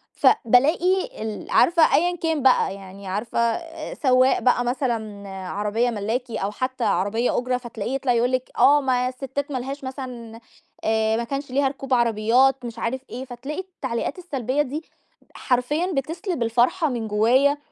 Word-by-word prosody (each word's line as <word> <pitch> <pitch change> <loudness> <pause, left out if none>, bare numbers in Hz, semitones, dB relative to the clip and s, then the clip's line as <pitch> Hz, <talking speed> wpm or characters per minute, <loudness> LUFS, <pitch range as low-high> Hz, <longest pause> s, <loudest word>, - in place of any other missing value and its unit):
فبالاقي 330 - +3
ال 215 -1 -6
عارفة 335 -1 +5
أيًا 350 +2 +2
كان 325 -3 -1
بقى 250 -6 +4
يعني 195 0 -11
عارفه 210 +6 -3
آآ، 325 +7 -2
سوّاق 255 -2 +3
بقى 245 -1 +2
مثلًا، 225 -6 -3
عربية 205 +5 -1
ملاكي 230 +2 -3
أو 195 +1 -2
حتى 255 +3 -3
عربية 205 +7 +1
أُجرة، 250 0 0
فتلاقيه 240 0 -5
يطلع 270 -2 +1
يقول 240 +2 +2
لِك 255 0 -2
آه 290 +1 +6
ما 250 -1 +1
الستات 270 +2 -5
ما 265 - -1
لهاش 270 +3 -6
مثلًا 250 -4 -7 0.4
آآ، 220 0 +1
ما 235 - -1
كانش 275 +2 -5
ليها 275 +1 +2
ركوب 270 -1 -4
عربيات 240 +3 +3
مش 230 -1 -7
عارف 250 +3 -2
إيه، 255 +2 -6
فتلاقي 265 +5 -6
التعليقات 300 -8 -4
السلبية 275 -5 -1
دي 295 +3 -4 0.5
حرفيًا 295 +8 0
بتسلِب 325 - -2
الفرحة 245 +8 +2
من 235 -4 -3
جوايا، 250 +7 +3
255 Hz, 155 wpm, -23 LUFS, 230-280 Hz, 0.5 s, آه